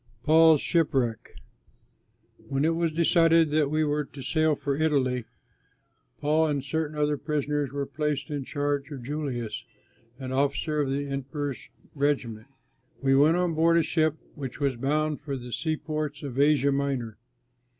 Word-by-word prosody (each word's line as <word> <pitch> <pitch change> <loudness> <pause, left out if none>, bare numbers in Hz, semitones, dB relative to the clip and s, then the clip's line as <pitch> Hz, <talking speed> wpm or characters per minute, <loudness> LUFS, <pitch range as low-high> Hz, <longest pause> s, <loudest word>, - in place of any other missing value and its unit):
PAUL'S 160 -1 +6
SHIPWRECK 135 -9 0 1.1
When 140 +1 0
it 165 - +2
was 165 -1 0
decided 165 -1 +4
that 150 -2 +2
we 155 +1 +1
were 150 0 0
to 140 -1 -11
sail 155 0 +2
for 140 0 -2
Italy, 135 -6 +1 0.9
Paul 155 +2 +2
and 145 -3 -1
certain 155 +2 -3
other 150 0 +1
prisoners 145 -1 -2
were 140 0 -2
placed 150 0 -3
in 145 -2 -2
charge 145 0 -2
of 135 -5 -7
Julius, 130 -5 -4 0.5
an 130 -2 -6
officer 140 +3 0
of 140 - -1
the 140 +1 -1
Emperor's 140 -1 -4 0.2
regiment. 135 -6 -1 0.5
We 135 -1 +3
went 150 +5 +5
on 180 -2 +1
board 165 +1 +3
a 165 - +4
ship 155 -1 +1 0.2
which 135 -4 -7
was 140 -3 0
bound 150 +4 -1
for 140 -2 -4
the 120 -1 -8
seaports 155 -2 -3
of 135 -2 -5
Asia 140 -1 +4
Minor. 135 -5 -2
145 Hz, 150 wpm, -27 LUFS, 135-155 Hz, 1.1 s, PAUL'S